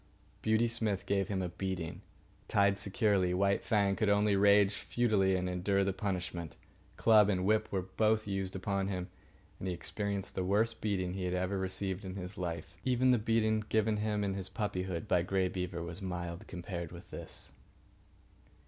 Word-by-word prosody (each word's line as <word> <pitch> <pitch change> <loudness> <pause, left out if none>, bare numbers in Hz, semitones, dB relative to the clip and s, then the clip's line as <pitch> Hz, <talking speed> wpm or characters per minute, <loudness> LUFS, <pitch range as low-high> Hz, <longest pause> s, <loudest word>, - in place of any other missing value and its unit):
Beauty 110 +2 +3
Smith 110 -4 -1
gave 100 -2 +1
him 95 -2 -1
a 90 - -2
beating. 90 -2 -4 0.5
Tied 100 0 +3
securely, 100 -2 +2
White 100 +1 +2
Fang 100 -4 +2
could 110 -1 +1
only 105 0 +3
rage 100 0 +5
futilely 100 -5 +1
and 90 0 -1
endure 95 +2 +1
the 95 0 0
punishment. 90 -5 -3 0.4
Club 110 -2 +6
and 95 -2 +1
whip 110 +1 +2
were 95 -2 0
both 110 +4 +1
used 95 -2 -3
upon 95 0 -1
him, 90 -2 -3 0.5
and 95 - -4
he 90 - -1
experienced 100 +3 -3
the 95 - -1
worst 110 +5 +1
beating 95 -4 -1
he 95 -1 -3
had 90 0 -1
ever 90 +2 -1
received 95 +1 -3
in 95 -1 -6
his 95 0 -6
life. 85 -3 -4
Even 130 +1 +3
the 125 - +4
big 105 - -10
beating 110 -1 +3
given 110 -1 +2
him 105 -1 0
in 100 -1 0
his 95 -1 -5
puppyhood 95 -3 -3
by 90 -3 +3
Grey 95 +1 +1
Beaver 90 -2 -3
was 85 +3 -5
mild 90 +1 -5
compared 85 -2 -5
with 85 0 -11
this. - - -8
95 Hz, 180 wpm, -33 LUFS, 90-105 Hz, 0.5 s, Club